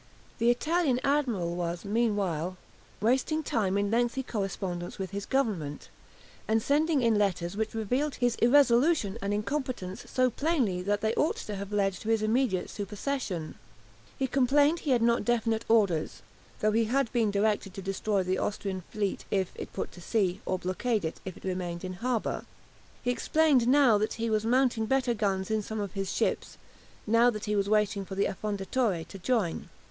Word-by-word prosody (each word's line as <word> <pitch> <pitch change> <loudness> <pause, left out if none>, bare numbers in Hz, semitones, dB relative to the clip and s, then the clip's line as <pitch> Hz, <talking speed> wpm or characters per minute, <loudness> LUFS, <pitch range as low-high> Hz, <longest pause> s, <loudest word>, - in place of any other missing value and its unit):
The 230 +1 +3
Italian 285 +1 +2
admiral 245 -12 +1
was 175 +1 -3
meanwhile 200 -6 0 0.4
wasting 265 +8 +1
time 200 -7 0
in 200 0 0
lengthy 240 +3 +1
correspondence 190 -6 -4
with 190 -1 -4
his 200 0 -5
Government, 200 - -1 0.6
and 220 +1 +3
sending 295 +3 +2
it 230 - +4
letters 195 -4 0
which 220 +1 -2
revealed 250 +7 -1
his 245 -1 +1
irresolution 245 - +4
and 200 +1 -2
incompetence 215 -3 -3
so 255 -1 +2
plainly 255 - 0
that 205 +2 0
they 220 0 +1
ought 305 - +1
to 210 - -5
have 200 +1 -6
led 200 -2 +1
to 215 +4 -6
his 225 -1 +2
immediate 220 -4 +1
supersession. 205 - -3 0.6
He 270 - 0
complained 280 +5 +3
he 300 - -4
had 245 -3 +3
not 235 0 +3
definite 225 -2 0
orders, 200 -9 +2 0.4
though 215 - +3
he 225 +1 +2
had 250 +1 0
been 230 -3 +2
directed 200 -1 0
to 195 - -6
destroy 195 +1 0
the 185 +1 -1
Austrian 195 -2 -3
fleet, 205 -2 -2
if 190 -3 0
it - - -7
put - - -4
to 175 - -13
sea, 195 -1 0
or 185 - 0
blockade 195 +3 -1
it, 160 - -5
if 190 - -6
it - - -16
remained 180 -2 -3
in 185 - -4
harbour. 245 -2 -1 0.6
He 245 - +1
explained 270 0 +3
now 255 -5 +5
that 215 - -1
he 230 -1 -2
was 215 0 +1
mounting 245 -2 +2
better 260 -1 +2
guns 195 -2 -1
in 220 0 +1
some 220 +1 -5
of 200 -3 -3
his 195 -1 -3
ships, - - -1 0.5
now 230 +3 +5
that 215 -3 -4
he 210 0 0
was 200 0 +1
waiting 210 -2 +2
for 190 0 -7
the 200 - +2
"Affondatore" 200 -2 -1
to 195 - -10
join. 210 -5 -1
215 Hz, 180 wpm, -29 LUFS, 195-245 Hz, 0.6 s, now